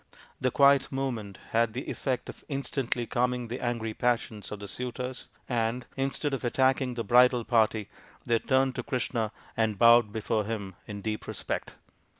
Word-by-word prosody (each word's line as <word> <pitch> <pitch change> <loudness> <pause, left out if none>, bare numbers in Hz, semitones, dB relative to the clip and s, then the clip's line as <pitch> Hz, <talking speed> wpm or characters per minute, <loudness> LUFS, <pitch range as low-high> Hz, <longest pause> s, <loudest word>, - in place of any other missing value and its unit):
The 130 - +2
quiet 140 +1 +5
movement 120 -8 -3
had 115 -1 +2
the 130 +4 -5
effect 130 -3 -2
of - - -10
instantly 135 -3 -1
calming 125 0 0
the 125 - -4
angry 115 -2 -2
passions 115 -4 -1
of 105 - -5
the 100 - -7
suitors, 125 +3 -5 0.2
and, 120 0 -1
instead 135 +1 -1
of 135 - -2
attacking 130 +1 +2
the 115 - -2
bridal 125 +2 +5
party, 110 -3 +2 0.4
they 115 -1 +2
turned 130 +1 +2
to - - 0
Krishna 120 -5 -1 0.2
and 110 -2 +1
bowed 115 0 +6
before 110 0 -1
him 100 -3 -4
in 100 -2 -6
deep 110 -1 -3
respect. - - -4
120 Hz, 160 wpm, -28 LUFS, 110-130 Hz, 0.4 s, bowed